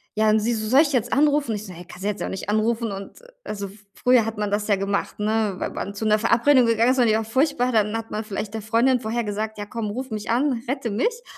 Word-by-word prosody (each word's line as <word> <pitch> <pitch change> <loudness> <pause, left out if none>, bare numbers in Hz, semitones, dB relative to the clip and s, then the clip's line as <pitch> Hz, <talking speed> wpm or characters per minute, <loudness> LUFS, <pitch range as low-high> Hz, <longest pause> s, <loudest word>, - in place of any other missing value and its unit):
ja, 215 0 +3
und 215 +1 +4
sie 235 +3 0
so: 215 -1 -3
„Soll 260 +6 +6
ich 305 -3 +1
jetzt 245 -3 0
anrufen?“ 290 -4 +2
Ich 210 +1 -6
so: 190 - -9
„Ne, 175 +1 -11
kannst 180 - -11
du 205 - 0
jetzt 210 - -4
auch - - -2
nicht 190 +1 -5
anrufen.“ 225 +1 0
Und, 195 - -8 0.2
also, 200 -2 -5 0.2
früher 250 -3 +3
hat 225 -1 -4
man 210 -1 -2
das 205 0 -1
ja 205 - +4
gemacht, 195 +1 -2
ne, 215 -1 0
wa - - -2
wann 200 - -4
zu 205 - -6
'ner 215 0 +3
Verabredung 240 +4 +4
gegangen 230 +1 +3
ist 260 - 0
und 240 - +4
die 215 - +3
war 220 - 0
furchtbar, 255 +2 +1
dann 215 -2 +1
hat 225 0 -7
man 215 +1 -3
vielleicht 210 0 -5
der 220 - -4
Freundin 235 +4 +2
vorher 235 +1 -2
gesagt: 215 +1 -4
„Ja, 205 - -5
komm, 220 0 -4
ruf 260 +4 -5
mich 210 0 -5
an, 245 0 +1
rette 250 -2 -2
mich.“ 465 - -1
220 Hz, 275 wpm, -23 LUFS, 210-245 Hz, 0.2 s, Soll